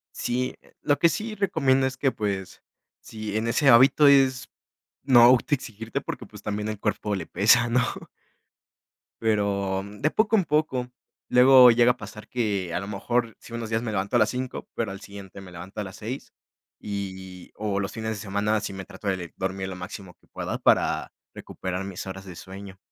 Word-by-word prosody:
Sí, 125 +1 -2 0.3
lo 145 -1 +2
que 170 - +5
sí 215 +4 -4
recomiendo 150 -10 +2
es 130 -1 -3
que, 135 - +1
pues, 100 -4 -4 0.4
sí 110 -1 -5
en 110 +1 -1
ese 135 +4 +3
hábito 135 +4 +7
es, 135 -3 +4 0.5
no 130 -3 +6
autoexigirte 120 -3 +2
porque, - - -6
pues, - - -13
también 105 0 -3
el 110 -2 -5
cuerpo 105 -1 -1
le 95 - -4
pesa, 120 +4 +4
¿no? 125 +2 +3 1.4
Pero, 100 -3 0
mm, 100 +1 -11
de 155 - +2
poco 220 0 +2
en 190 - +1
poco, 150 -5 0 0.4
luego 125 0 +8
llega 120 +1 +5
a - - -6
pasar 105 0 -10
que, 100 -8 -1
a - - 0
lo 100 - -6
mejor, 115 +3 -1
sí - - -15
unos 115 -1 -5
días, 110 0 0
me 115 -2 -3
levanto 100 +1 -2
a - - +5
las 110 - +3
5, 130 0 -4
pero 115 -4 -2
al 100 +1 -8
siguiente 100 -1 -11
me 95 -2 -12
levanto 90 +5 -7
a - - -3
las 95 -1 -9
6 120 +6 -6 0.5
y 100 -2 -5 0.3
y - - -32
o 100 -2 -2
los 95 +1 -3
fines 110 0 -4
de - - -3
semana 105 +1 -1
si 100 - -4
me 95 -1 -7
trato 100 - -6
de 95 - 0
le 85 -2 -8
dormir 95 0 -3
lo 95 - -6
máximo 90 0 -8
que - - -32
pueda - - -4
para - - +2 0.2
recuperar 95 0 -5
mis 95 -1 -6
horas 95 0 -7
de 90 -2 -9
sueño. 95 0 -10
110 Hz, 200 wpm, -25 LUFS, 100-125 Hz, 1.4 s, luego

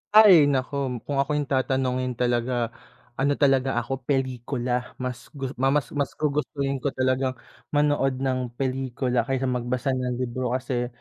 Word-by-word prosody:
Ay 215 -2 +10 0.2
naku 130 +2 -1 0.3
kung 140 -1 -2
ako 140 +2 +1
'yung 145 -2 -1
tatanungin 130 -1 0
talaga 120 -1 0 0.5
ano 140 +2 +3
talaga 135 -3 +2
ako 135 +1 -5
pelikula, 125 -2 -1
mas 125 -1 -5
gu 135 -2 -4
ma 135 - +3 0.3
mas 140 -2 0
gugustuhin 145 -2 -1
ko 140 - -2
talagang 130 0 +1 0.4
manood 145 -2 +2
ng 130 -1 +1 0.2
pelikula 130 -2 -1
kaysa 135 0 0
magbasa 125 +2 -1
ng 125 -1 -1
libro. 125 0 -2
Kasi 125 -1 -1
130 Hz, 140 wpm, -25 LUFS, 125-135 Hz, 0.5 s, Ay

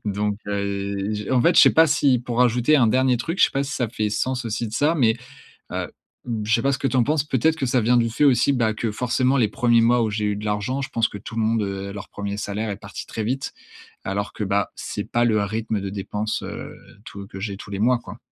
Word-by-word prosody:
donc 105 0 -1
heu, 100 0 -2
j 105 +1 -5
en 130 - +3
fait, 170 +8 +4
je - - +10
sais - - +8
pas 160 0 +7
si 140 -4 +3
pour 120 0 0
ajouter 125 +5 +3
un 120 -5 +4
dernier 130 +2 +3
truc, 165 +10 -4
je - - +7
sais - - 0
pas 135 - 0
si 140 - -5
ça 120 -3 -1
fait 105 -1 -2
sens 125 +4 -1
aussi 115 +1 -2
de 105 - -9
ça, 150 +7 +2
mais 115 -5 +3 0.6
heu, - - -2 0.4
b 115 -3 -3
je 110 - 0
sais 115 - +2
pas 140 - +2
ce 130 - -1
que - - -1
tu 130 - 0
en - - +5
penses? 150 0 +1
Peut-être 150 +3 +1
que 145 - -2
ça 125 0 +2
vient 120 +3 +3
du 115 -1 +2
fait 145 - +1
aussi, 135 0 +4
bah, 115 -5 +1
que, 115 +1 -2
forcément 130 +3 +1
les 110 -4 +3
1ers 120 0 +3
mois 120 +1 +4
où 110 - 0
j'ai 105 0 -1
eu 105 -1 0
de 105 - -7
l'argent, 105 +6 -1
je 135 - -5
pense 115 -3 +1
que - - -9
tout 110 - -9
le - - +1
monde, 110 0 +1
heu, 100 0 -4
leur 100 -2 -8
1er 100 0 -4
salaire 105 +2 -3
est 100 - -3
parti - - -9
très 110 - -4
vite 130 +4 -3 0.5
alors 100 +2 -2
que, 105 - -4
bah, 100 0 0
c'est - - -5
pas 120 0 +2
le 110 -3 +2
rythme 110 0 -2
de 100 - -4
dépenses, 105 +2 -3
heu, - - -7 0.3
tout 100 0 -9
que 95 - -9
j'ai 100 -2 -4
tous 105 - -11
les 100 - -4
mois, 120 +2 +3
quoi. - - -11
115 Hz, 275 wpm, -23 LUFS, 105-125 Hz, 0.6 s, je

